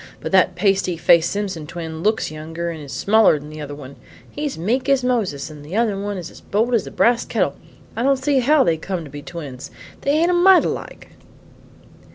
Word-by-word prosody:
"But - - -5
that 185 -1 +4
pasty 190 -2 +1
faced 170 0 +4
Simpson 190 -7 -4
twin 160 -1 -6
looks 215 -3 0
younger 165 +2 -5
and 160 -2 -8
is 140 - -10
smaller 205 - +4
than 150 +1 -10
the 155 0 -8
other 145 -1 -6
one. 140 -1 -11 0.3
He's 290 - -4
meek 245 - -1
as 275 -2 +3
Moses 205 - -1
and 150 -1 -11
the 155 +6 -7
other 225 -2 +1
one 200 0 -4
is 175 -2 -7
as - - -15
bold 225 +5 0
as 230 - +1
a - - -7
brass 235 0 +2
kettle; - - -1 0.4
I - - -2
don't 275 +2 +3
see 265 +1 +1
how 280 +3 +4
they 165 -1 +1
come 180 +1 -4
to 145 - -11
be 145 0 -8
twins; 145 -6 -8 0.3
they - - -2
ain't 335 +4 +3
a - - +1
mite 360 +1 +6
alike." - - -5
190 Hz, 215 wpm, -21 LUFS, 155-240 Hz, 0.4 s, mite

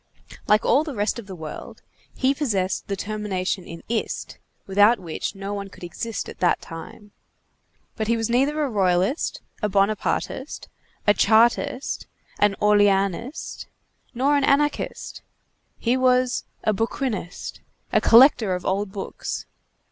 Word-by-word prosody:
Like 210 +1 +4
all 285 - +4
the 300 -4 -6
rest 210 +3 0
of 215 - -10
the 190 - -7
world, 160 -3 -9 0.3
he 265 +1 +2
possessed 205 -11 -1
the 200 - -2
termination 195 -3 -3
in 165 0 -9
ist, 225 -1 -3 0.3
without 205 +4 +5
which 175 +2 -5
no 195 +1 -5
one 200 -1 -5
could 190 - -15
exist 220 +5 -4
at - - -10
that 180 - +3
time, 205 +5 -10 0.8
but 220 - -2
he 230 +1 +2
was 225 -1 -1
neither 275 +6 +2
a - - +1
Royalist, 195 - +1 0.2
a 210 - +1
Bonapartist, 205 +7 -1 0.4
a 205 - +6
Chartist, 235 +4 +2 0.3
an 205 -1 +3
Orleanist, 205 - +1 0.5
nor 275 +4 +3
an 285 - +2
Anarchist; 290 +2 0 0.6
he 240 +2 +1
was 255 -1 +2 0.2
a 215 - +2
bouquinist, 225 -3 -3 0.3
a - - +4
collector 230 -5 +6
of 180 - -6
old 195 +1 -1
books. 195 -1 -5
210 Hz, 140 wpm, -24 LUFS, 195-250 Hz, 0.8 s, a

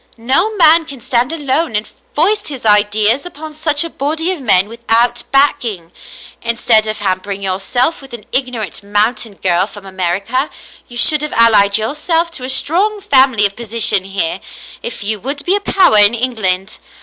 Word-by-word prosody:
No 275 - 0
man 330 -3 +5
can 275 -4 -9
stand 245 +1 -1
alone 290 -4 -1
and 210 +1 -2 0.3
foist 390 +8 +1
his 270 -6 -7
ideas 210 +4 +3
upon 315 -3 -10
such 300 -1 +1
a 335 - -6
body 320 +5 -2
of 355 -6 -5
men, 200 -5 +3
without 235 +1 0
backing. 245 - 0 0.5
Instead 230 -2 +1
of 215 - -3
hampering 195 0 -3
yourself 220 - -1
with 270 -1 -14
an 235 -3 -10
ignorant 250 -7 -3
mountain 210 +1 -1
girl 185 0 0
from 205 -1 -12
America, 195 - -2 0.4
you 240 - -10
should 300 +5 +4
have 300 - -3
allied 215 -3 +5
yourself 325 +9 -1
to 265 - -5
a 255 - -5
strong 390 +10 +1
family 260 - +3
of 200 0 -1
position 230 -3 +1
here, 190 -2 -2 0.4
if 235 - -5
you 215 +1 0
would 280 +6 -6
be 370 - +2
a - - 0
power 370 - +3
in 205 +3 +4
England. 215 -6 -3
235 Hz, 170 wpm, -14 LUFS, 205-290 Hz, 0.5 s, man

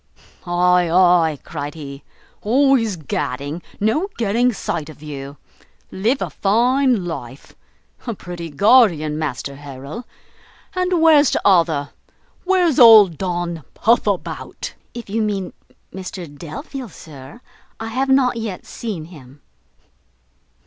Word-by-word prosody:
"Ay, 180 0 +3
ay," 175 -3 +4
cried 145 -1 -6
he, 140 -3 -9 0.4
"always 245 -2 +2
gadding, 145 0 -4 0.2
no 225 - +1
getting 235 +3 +2
sight 160 -7 -4
of 155 -1 -13
you. 140 -1 -8 0.5
Live 225 +8 0
a - - -5
fine 240 +1 +2
life! 135 -6 -8 0.5
A 230 - -2
pretty 175 -3 -7
guardian, 160 - +4
Master 140 -2 -4
Harrel! 145 - -9 0.7
and 365 -2 0
where's 300 -4 +6
t'other? 165 -7 +2 0.5
where's 360 -6 +2
old 215 - +8
Don 175 -3 -3
Puffabout?" 215 -4 -1 0.2
"If 235 - -7
you 220 +3 -1
mean 200 -4 -2 0.4
Mr 185 -1 -7
Delvile, 255 - -8
sir, 150 - -12 0.4
I 225 0 -5
have 265 +4 -1
not 260 -2 +3
yet 220 -5 -5
seen 200 -9 -6
him." 145 -5 -15
185 Hz, 115 wpm, -20 LUFS, 155-235 Hz, 0.7 s, old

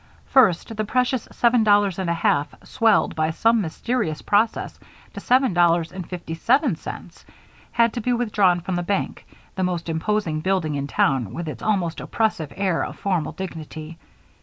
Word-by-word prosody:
First 225 -3 +3
the 215 - -1
precious 250 +3 0
seven 235 -1 +3
dollars 205 -3 +3
and 185 -2 -1
a - - +2
half, 145 -3 0
swelled 225 -3 +2
by 155 0 +1
some 225 +7 +2
mysterious 185 -1 -2
process 215 +2 0 0.3
to - - -6
seven 255 -3 +2
dollars 170 -1 +3
and 185 -2 -8
fifty 175 -3 -6
seven 245 - +2
cents, - - -9 0.5
had 235 -1 +3
to 240 - -3
be 250 - 0
withdrawn 210 -7 +2
from 180 0 -3
the - - 0
bank, 195 +3 -3 0.3
the 190 - -2
most 175 -2 -2
imposing 165 -1 -1
building 175 -2 0
in 140 -1 -3
town 130 -7 +1
with 170 -1 -5
its 155 - -6
almost 190 -6 0
oppressive 215 -10 -1
air 190 -4 0
of - - -6
formal 185 -5 -1
dignity. 165 -3 -8
185 Hz, 170 wpm, -23 LUFS, 165-220 Hz, 0.5 s, First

